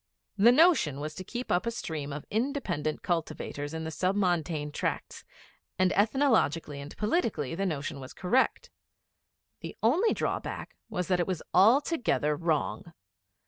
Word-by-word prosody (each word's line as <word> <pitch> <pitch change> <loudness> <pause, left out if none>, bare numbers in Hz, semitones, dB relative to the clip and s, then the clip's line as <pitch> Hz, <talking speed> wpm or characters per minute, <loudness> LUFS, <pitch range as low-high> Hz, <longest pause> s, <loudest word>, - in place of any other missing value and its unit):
The 210 +4 +6
notion 270 - +4
was 155 +1 -4
to 185 - -7
keep 245 +6 -5
up 180 +5 +1
a - - +3
stream 160 -11 -5
of 145 +1 -6
independent 215 - -1
cultivators 155 -3 -3
in 160 0 -4
the 160 - -4
Sub 185 +5 0
Montane 165 -6 0
Tracts; - - -3 0.5
and 185 0 +3
ethnologically 205 - +2
and 140 +2 -10
politically 210 - 0
the 195 +3 -1
notion 145 -2 -3
was 130 0 -9
correct. 245 +8 0 0.9
The - - -8
only 330 - +3
drawback - - -3
was 180 -5 -2
that 180 -1 +2
it 175 - 0
was 185 -4 -3
altogether 225 - +3
wrong. 155 - -2
175 Hz, 145 wpm, -29 LUFS, 150-225 Hz, 0.9 s, The